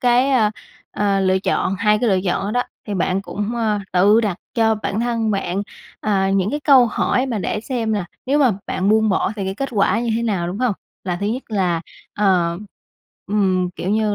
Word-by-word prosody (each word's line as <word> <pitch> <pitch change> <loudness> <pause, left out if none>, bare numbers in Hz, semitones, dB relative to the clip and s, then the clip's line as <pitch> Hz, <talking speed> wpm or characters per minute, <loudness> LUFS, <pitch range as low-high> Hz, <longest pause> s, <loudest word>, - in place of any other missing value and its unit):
cái, 250 +2 +3
ờ, 225 -5 +3 0.4
ờ, 200 -1 0
lựa 190 0 +2
chọn, 190 0 0
2 210 +1 +3
cái 245 - +2
lựa 190 - +3
chọn 185 +1 0
đó 200 - -2
đó - - +1 0.2
thì 205 - -3
bạn 185 +1 0
cũng, 210 +3 -4
ơ, 215 -3 +1
tự 200 +5 +5
đặt 205 -6 -1 0.2
cho 220 -2 +3
bản 210 0 -3
thân 230 -2 0
bạn, 195 -1 -1 0.4
ờ, 195 -3 +1
những 195 +1 +1
cái 295 +3 -2
câu 265 -5 +6
hỏi 250 +3 0
mà 235 -5 -2
để 210 +2 -2
xem 230 -3 -2
là 200 -4 -1 0.2
nếu 280 +3 +2
mà 270 -4 +5 0.2
bạn 185 +1 -1
buông 220 +1 +4
bỏ 195 0 +1
thì 195 - -3
cái 190 0 -3
kết 275 +5 -3
quả 215 +1 +2
như 235 -1 -1
thế 235 - -1
nào, 200 -7 -1
đúng 180 +4 -4
hông? 250 -2 +1 0.3
Là 180 -2 -1
thứ 200 - -1
nhất 240 +5 -2
là, 180 -6 0 0.3
ờ, 180 -4 +2 0.7
ừm, 190 -3 +1
kiểu 185 - -3
như 215 0 +1
210 Hz, 220 wpm, -20 LUFS, 190-230 Hz, 0.7 s, câu